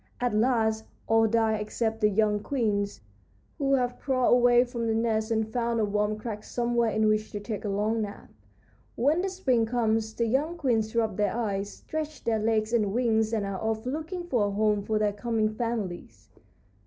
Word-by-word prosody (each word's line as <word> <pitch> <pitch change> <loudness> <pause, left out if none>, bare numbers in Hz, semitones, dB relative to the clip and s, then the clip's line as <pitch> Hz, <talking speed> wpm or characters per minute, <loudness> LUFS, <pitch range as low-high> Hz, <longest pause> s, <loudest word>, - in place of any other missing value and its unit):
At 245 -2 0
last 220 -1 +1 0.2
all 225 0 +4
die 220 0 +2
except 220 +1 -2
the 210 - +5
young 210 0 +2
queens, 205 - -1 0.6
who 275 -1 +3
have 245 -1 -1
crawled 255 -3 +2
away 245 0 +5
from 240 -2 -4
the 220 - +1
nest 220 -1 0
and 220 -1 0
found 235 -1 0
a 215 - +2
warm 210 +1 0
crack 215 -1 -6
somewhere 235 -1 0
in 220 0 +1
which 215 0 +1
to 205 - -3
take 210 0 -5
a - - -1
long 210 +3 0
nap. 205 -1 -7 0.6
When 295 +8 +2
the 385 - -1
spring 260 -12 +1
comes 225 -2 0
the 235 - 0
young 290 +9 0
queens 225 -7 0
rub 220 -4 0
their 205 0 +1
eyes, 200 -3 -2
stretch 310 -1 -6
their 225 -1 +1
legs 215 +1 0
and 210 -4 +2
wings, 220 -2 +1
and 215 -3 0
are 195 -1 -4
off 220 +1 -2
looking 320 +7 -4
for 245 -12 +1
a - - -1
home 210 0 +1
for 215 +2 -1
their 210 -1 +1
coming 220 0 0
families." 185 - -4
220 Hz, 190 wpm, -27 LUFS, 215-240 Hz, 0.6 s, the